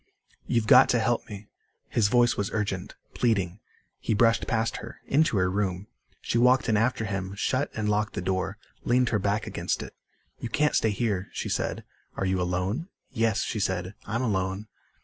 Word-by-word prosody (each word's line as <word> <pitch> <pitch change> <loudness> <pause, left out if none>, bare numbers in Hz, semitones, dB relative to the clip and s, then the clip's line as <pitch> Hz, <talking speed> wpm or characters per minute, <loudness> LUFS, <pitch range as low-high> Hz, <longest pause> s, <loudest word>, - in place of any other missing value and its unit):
"You've 115 -2 +1
got - - +7
to 120 - +3
help 115 +1 0
me." 105 0 -8 0.4
His 110 -4 +2
voice 120 +2 +4
was 100 -1 -1
urgent, 100 -4 -2 0.2
pleading. 100 -6 0 0.4
He 110 - 0
brushed 115 +1 +3
past 110 0 0
her, 115 - -9
into 145 -5 +2
her 90 -1 +3
room. 95 -1 -1 0.4
She 115 - 0
walked 125 +2 +4
in 110 - +3
after 115 +2 +1
him, 100 -1 -3
shut 130 +7 0
and 110 -1 -1
locked 105 0 0
the - - -3
door, 95 +2 -1 0.3
leaned 125 0 +3
her 105 - +1
back 100 +3 0
against - - -2
it. - - -10 0.5
"You 120 - -4
can't 150 +4 +2
stay 110 - +3
here," 100 -3 -1
she - - -3
said. - - -2 0.3
"Are 95 - -2
you 95 -1 +1
alone?" 90 - -1 0.2
"Yes," 115 -4 +1
she 110 - -3
said. 95 -1 -1
"I'm 115 +3 -1
alone." 95 -2 -1
105 Hz, 185 wpm, -27 LUFS, 95-115 Hz, 0.5 s, got